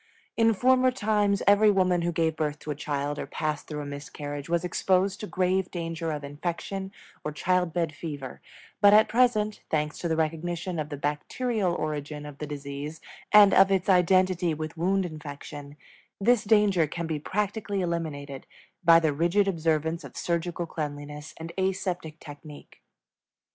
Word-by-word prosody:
In 225 -1 +3
former 255 +3 +4
times 210 -4 +1
every 205 +1 +6
woman 185 -3 +3
who 175 0 0
gave 160 -1 0
birth 150 -1 -2
to 150 - -5
a - - -3
child 145 0 -3
or - - -4
passed 155 -1 -3
through 150 -1 -4
a - - -6
miscarriage 145 +1 -6
was 170 0 +1
exposed 185 +2 +1
to 210 - -5
grave 185 0 0
danger 165 -1 -4
of 150 -1 -4
infection 175 +6 -4 0.3
or 150 - -3
child 180 +3 +1
bed 165 -2 -1
fever; 145 -5 -7 0.4
but 205 0 +8
at 215 - +6
present 215 -3 +2
thanks 150 0 -1
to 175 - -2
the 160 - +1
recognition 165 +2 -2
of 150 -1 -3
the 145 - -5
bacterial 180 - -1
origin 150 -1 -4
of 145 -1 -10
the 150 - -4
disease 145 +1 -6 0.3
and 210 -2 +8
of 195 0 +6
its 190 0 +1
identity 180 -2 +3
with 155 +1 -5
wound 190 +3 +1
infection 145 -2 -8 0.4
this 220 +2 +3
danger 205 -6 +4
can 170 +3 -4
be 160 -2 -2
practically 205 +3 -2
eliminated 150 -6 -4 0.4
by 165 -1 +7
the 160 -3 +1
rigid 175 +7 +2
observance 160 -2 0
of - - -11
surgical 170 0 -2
cleanliness 150 -1 -6
and 165 +1 -7
aseptic 180 -4 -2
technique. 145 0 -12
170 Hz, 165 wpm, -27 LUFS, 150-190 Hz, 0.4 s, but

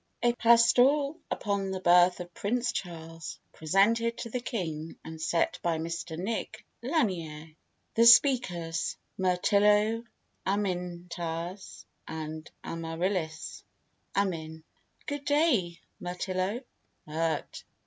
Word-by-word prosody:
A 240 0 +4
PASTORAL 245 +6 +4
UPON 200 -2 -1
THE 190 0 -3
BIRTH 180 0 +5
OF 175 0 -9
PRINCE 235 +2 0
CHARLES: 165 -5 -6
PRESENTED 225 +8 +2
TO 235 - -5
THE 250 - -1
KING, 165 - -4
AND 160 0 -8
SET 165 +1 +1
BY 170 -2 0
MR 165 0 -4
NIC. 205 +6 -4 0.2
LANIERE 170 - -2 0.4
THE 230 +1 +6
SPEAKERS: 185 - +4 0.2
MIRTILLO, 210 +4 +3 0.4
AMINTAS, 180 -2 -3 0.2
AND 155 0 -6
AMARILLIS 165 0 -3 0.5
AMIN. 160 -5 -1 0.4
Good 285 -1 -4
day, 265 - +2 0.2
Mirtillo. 185 +6 -2 0.4
MIRT. 160 0 -2
185 Hz, 95 wpm, -29 LUFS, 165-230 Hz, 0.5 s, THE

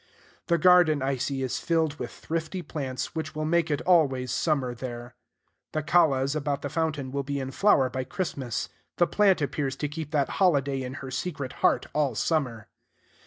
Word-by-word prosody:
The 170 - +3
garden, 170 -4 +5
I 135 0 0
see, 135 +1 -2
is 130 - -2
filled 160 -3 0
with 125 - -4
thrifty 165 +3 -4
plants, 135 -4 -4
which 155 -1 -4
will 155 0 -2
make 165 0 +2
it 145 -2 0
always 135 -8 +3
summer 140 -6 0
there. 120 0 -7 0.6
The 155 - -1
callas 145 -4 +3
about 145 -2 -2
the 145 - -2
fountain 150 -4 -1
will 140 +1 -1
be 140 +1 -3
in 135 0 -4
flower 140 -5 +4
by 130 0 -3
Christmas: 130 - -3 0.3
the 175 - +5
plant 195 -3 +3
appears 140 -1 -2
to 150 - -2
keep 150 0 -6
that 145 -4 +1
holiday 140 -7 +3
in 130 +1 -5
her 130 - -7
secret 140 -1 -4
heart - - +3
all 145 -5 +1
summer. 125 -5 -1
145 Hz, 180 wpm, -27 LUFS, 130-160 Hz, 0.6 s, garden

